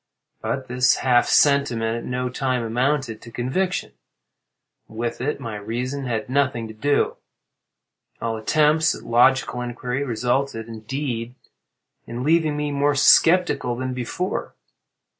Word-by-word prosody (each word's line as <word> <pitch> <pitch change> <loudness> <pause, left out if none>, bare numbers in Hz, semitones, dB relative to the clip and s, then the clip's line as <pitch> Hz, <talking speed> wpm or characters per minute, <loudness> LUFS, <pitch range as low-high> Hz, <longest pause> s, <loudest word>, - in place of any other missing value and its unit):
But 130 -1 -3
this 125 +1 +3
half 125 -2 +3
sentiment 120 -6 +3
at - - -9
no 125 0 -2
time 130 -1 -1
amounted 125 0 -1
to 115 - -11
conviction. 155 +11 -2 1.0
With 115 +2 -4
it 145 +4 -2
my 110 -2 -5
reason 125 +6 -4
had 115 -1 -2
nothing 130 -4 0
to 110 - -9
do. 145 +6 0 1.0
All 115 -1 -2
attempts 155 +7 +2
at - - -11
logical 125 +1 +3
inquiry 125 +2 -3
resulted, 125 -1 -1
indeed, 115 +1 -4 0.7
in 120 +2 -5
leaving 155 0 +2
me 150 0 -2
more 145 0 +1
sceptical 145 -3 +4
than 130 +1 -3
before. 130 +9 -4
125 Hz, 125 wpm, -23 LUFS, 115-140 Hz, 1.0 s, sceptical